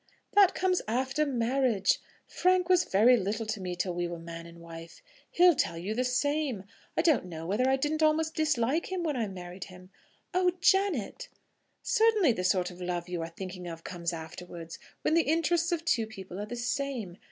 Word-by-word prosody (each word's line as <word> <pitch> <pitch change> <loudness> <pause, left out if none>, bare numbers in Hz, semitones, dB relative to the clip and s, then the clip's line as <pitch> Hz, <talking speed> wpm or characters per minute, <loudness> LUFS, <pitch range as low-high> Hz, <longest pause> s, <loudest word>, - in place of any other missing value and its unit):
"That 400 -2 +6
comes 365 -1 +1
after 265 +6 0
marriage. 240 -5 +1 0.3
Frank 365 0 +1
was 365 -1 +4
very 230 +6 +5
little 210 +2 -2
to 215 -2 -3
me 180 -1 -3
till 180 0 -2
we 175 0 -1
were 170 0 -5
man 165 0 -8
and 170 0 -13
wife. 165 - -11 0.3
He'll 355 0 +6
tell 170 - -1
you 185 +6 -3
the 250 +3 0
same. 265 -3 0 0.3
I 325 - +3
don't 315 - +3
know 165 -2 -7
whether 215 +9 +1
I 265 - +4
didn't 300 +4 -1
almost 315 +1 +2
dislike 305 +1 0
him 370 -2 -2
when 305 -4 -1
I 230 -4 -1
married 180 -1 -8
him." 185 0 -14 0.4
"Oh, 365 0 +3
Janet!" 385 - +1 0.5
"Certainly 445 - +4
the 185 -5 -2
sort 185 -1 +1
of 180 +1 -12
love 175 -1 -3
you 175 -2 -3
are 165 - -4
thinking 180 +1 -7
of 165 -1 -7
comes 175 -1 -3
afterwards; 165 0 -8 0.2
when - - +2
the 335 - +5
interests 335 +3 +1
of 330 -1 -1
two 230 -10 +1
people 190 -3 -9
are 210 - -4
the 240 - -5
same. 240 -6 -3
230 Hz, 195 wpm, -29 LUFS, -, 0.5 s, That